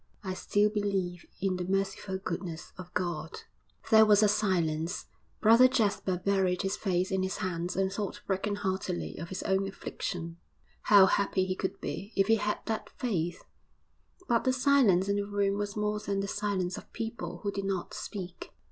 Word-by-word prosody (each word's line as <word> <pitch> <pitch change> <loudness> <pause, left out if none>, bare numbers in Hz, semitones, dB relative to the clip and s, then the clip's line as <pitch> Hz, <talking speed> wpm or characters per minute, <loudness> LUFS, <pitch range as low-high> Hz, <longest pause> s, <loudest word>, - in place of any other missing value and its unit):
'I 190 -1 -3
still 205 +2 +2
believe 195 -4 -2
in 190 -1 +1
the 180 - -2
merciful 195 +1 -1
goodness 175 -3 -5
of 180 -1 -10
God!' 165 -3 -3 0.5
There 220 0 +9
was 210 0 +6
a - - +6
silence. 180 -5 0 0.4
Brother 230 +4 +7
Jasper 205 -7 +1
buried 190 0 +1
his 195 +1 0
face 185 -2 0
in 190 0 +1
his 190 0 -2
hands 175 -1 -2
and 190 0 0
thought 205 -1 -4
brokenheartedly 190 -2 -2
of 170 - -6
his 190 - -4
own 190 0 +1
affliction. 175 -3 -5 0.5
How 200 -2 +8
happy 190 -1 +1
he 185 0 -2
could 190 - -3
be 200 +4 -5
if 195 - +4
he 225 0 +4
had 210 0 -1
that 220 -1 -3
faith.... 175 - -2 0.8
But 235 -2 +2
the 260 - +2
silence 250 -9 +4
in 200 0 +1
the 200 0 -1
room 200 0 0
was 205 0 -3
more 210 0 0
than 200 -1 -2
the 200 - -3
silence 190 -3 -1
of - - -17
people 225 0 -5
who 200 - 0
did 200 0 -4
not 190 -2 -2
speak. 185 -4 -7
195 Hz, 175 wpm, -30 LUFS, 185-210 Hz, 0.8 s, There